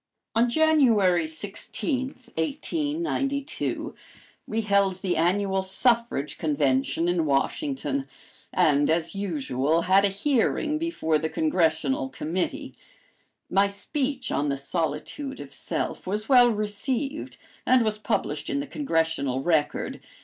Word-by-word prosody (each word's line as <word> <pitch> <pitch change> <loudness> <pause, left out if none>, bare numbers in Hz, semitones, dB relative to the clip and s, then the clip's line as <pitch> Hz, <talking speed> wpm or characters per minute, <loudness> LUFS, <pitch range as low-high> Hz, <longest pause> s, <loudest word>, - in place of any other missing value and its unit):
On 235 +2 +3
January 235 - +4
16, 205 - -3 0.3
1892, 290 - -2 0.5
we 225 +1 -1
held 200 -3 +2
the 185 -1 -2
Annual 190 +4 +1
Suffrage 225 - 0
Convention 145 +1 +1
in 175 -2 +2
Washington, 270 - -1 0.4
and, 145 -1 +3
as 165 +1 +1
usual, 160 -5 0
had 190 +2 +4
a - - +5
hearing 285 +8 0
before 160 - 0
the 160 - -2
Congressional 155 -5 +1
Committee. 165 +6 -3 0.7
My 195 +1 +3
speech 265 +7 -3
on 145 +1 0
the 140 - -1
"Solitude 165 - -3
of - - -9
Self" - - -3
was 210 +3 -2
well 245 -2 +7
received 235 +7 -2 0.3
and 255 -2 +4
was 215 -1 -1
published - - -2
in 280 - 0
the 285 - -3
Congressional 160 - -1
Record. 155 -3 0
195 Hz, 115 wpm, -26 LUFS, 160-260 Hz, 0.7 s, well